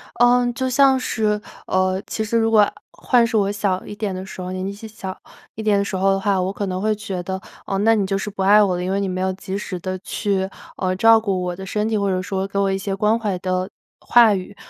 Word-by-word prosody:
嗯， 245 +1 +4
就 260 +2 -1
像 270 0 +5
是， 215 -4 0 0.3
呃， 185 0 +1
其 220 - -3
实 230 +2 0
如 225 0 +2
果 210 -2 +5 0.2
换 240 -2 +2
是 230 -1 -1
我 200 -1 +2
小 200 -3 -1
一 - - -7
点 205 -2 -3
的 185 +1 -5
时 190 - -9
候， 180 0 -5
年 185 0 -3
纪 195 - -3
细 210 +2 -10
小 195 -3 -7 0.4
一 220 - -6
点 210 -2 +3
的 200 - +1
时 200 - -5
候 195 +1 +2
的 195 - +1
话， 195 -1 +1
我 185 +1 -1
可 200 0 -3
能 185 -1 -3
会 215 +2 +1
觉 200 -4 -5
得， 190 +1 -4 0.3
呃， 195 - -2
那 225 +3 +4
你 205 -3 +1
就 195 0 -1
是 210 - -4
不 195 -1 -4
爱 205 +2 +6
我 185 -3 +1
了， 175 - -3
因 180 - -2
为 195 +1 0
你 200 - -1
没 185 0 -3
有 190 0 0
及 190 0 -5
时 185 -3 -5
地 185 +1 -4
去， 190 0 -2 0.3
呃， 185 -1 -1
照 225 +3 +6
顾 195 -4 -1
我 180 0 -2
的 190 - -7
身 210 +2 -1
体， 220 - 0
或 200 -1 0
者 185 -1 0
说 190 +1 -2
给 200 0 -4
我 195 -1 +2
一 190 - -1
些 195 0 -3
关 210 +3 +2
怀 205 -5 -2
的 185 +1 -2 0.3
话 235 -3 +5
语。 195 +1 -6
200 Hz, 295 characters per minute, -21 LUFS, 190-215 Hz, 0.4 s, 爱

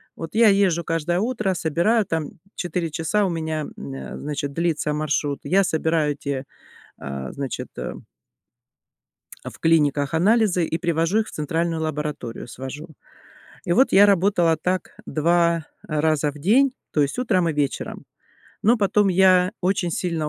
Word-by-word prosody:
Вот 165 -1 -7
я 230 -1 +6
езжу 190 -4 +2
каждое 165 +2 -1
утро, 215 -4 0
собираю, 175 +7 +1
там 160 -3 -3 0.2
4 175 -1 -2
часа 165 +7 0
у - - 0
меня, 160 -2 -3
мм, 135 0 -7
значит, 145 -1 -4
длится 160 -2 0
маршрут, 145 -1 -1
я 195 +2 +3
собираю 160 -3 +1
эти, 140 -2 -4 0.6
э, 70 -1 -6
значит, 140 -3 -5
э - - -4 1.5
в - - -9
клиниках 150 -3 +2
анализы 190 -1 +3
и 165 - -2
привожу 170 +4 +1
их 215 - -1
в - - -10
центральную 165 +2 -2
лабораторию, 150 -7 -4
свожу. 135 +6 -8 0.8
И 175 - -1
вот 260 +9 +4
я 200 +2 +7
работала 190 -4 +3
так 180 +3 -3
2 170 0 +2 0.2
раза 155 -1 +1
в - - -19
день, 250 - +3 0.2
то 150 - +1
есть 140 - 0
утром 185 -9 +1
и - - -1
вечером. 145 -2 -3 0.6
Но 235 +4 +4
потом 205 -1 +2
я 185 0 +4
очень 180 -2 0
сильно 165 -3 -2
165 Hz, 150 wpm, -23 LUFS, 150-185 Hz, 1.5 s, я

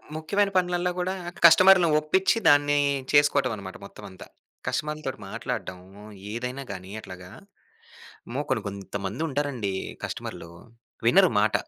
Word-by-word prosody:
ముఖ్యమైన 195 +6 0
పనులల్లా 180 0 0
కూడా 180 +1 -1 0.3
కస్టమర్‌ని 180 +2 +7
ఒప్పించి 190 +8 +1
దాన్ని 145 0 +4 0.3
చేసుకోవటం 145 -3 +3
అన్నమాట 95 -2 -9
మొత్తం 100 - -13
అంతా. 95 -2 -12 0.4
కస్టమర్‌లతోటి 150 -4 -3
మాట్లాడడం, 110 -4 -5 0.5
ఏదైనా 125 +4 -4
గాని 95 0 -8
అట్లాగా. 90 -2 -11 1.0
అమ్మో! - - -3
కొన్ని - - 0
కొంతమంది 100 - -5
ఉంటారండి 135 -8 -2 0.3
కస్టమర్‌లు. 85 - -6 0.6
వినరు 185 +8 +5
మాట. 105 +1 +1
145 Hz, 115 wpm, -25 LUFS, 100-170 Hz, 1.0 s, కస్టమర్‌ని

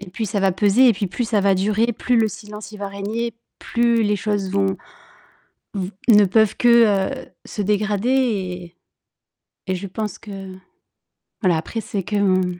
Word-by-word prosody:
Et 200 -3 -10
puis 220 +4 -3
ça 200 0 -2
va 195 -1 +3
peser, 205 +7 +4
et - - +6
puis 200 0 -2
plus 180 +7 -3
ça 215 -3 +2
va 195 0 +3
durer, 210 +4 +1
plus 245 +2 0
le 220 -1 +3
silence 210 +1 -9
il 210 - -10
va 200 0 -4
régner, 210 +4 -4 0.2
plus 235 -1 +1
les 210 -1 +1
choses 205 -2 -2
vont 195 0 +1 1.0
v 190 -1 -3 0.2
ne 210 -2 +7
peuvent 215 +2 +2
que, 230 -5 +4
heu, - - -16 0.2
se 210 - -5
dégrader 210 +2 0
et 190 -9 -1 0.9
et 185 - 0
je 190 +2 -5
pense 210 +1 -5
que 195 -2 -9 0.9
voilà, 180 -6 +3
après 225 +8 -4
c'est 200 -3 -4
que 210 - -4
m 185 -3 +1
205 Hz, 180 wpm, -21 LUFS, 190-220 Hz, 1.0 s, ne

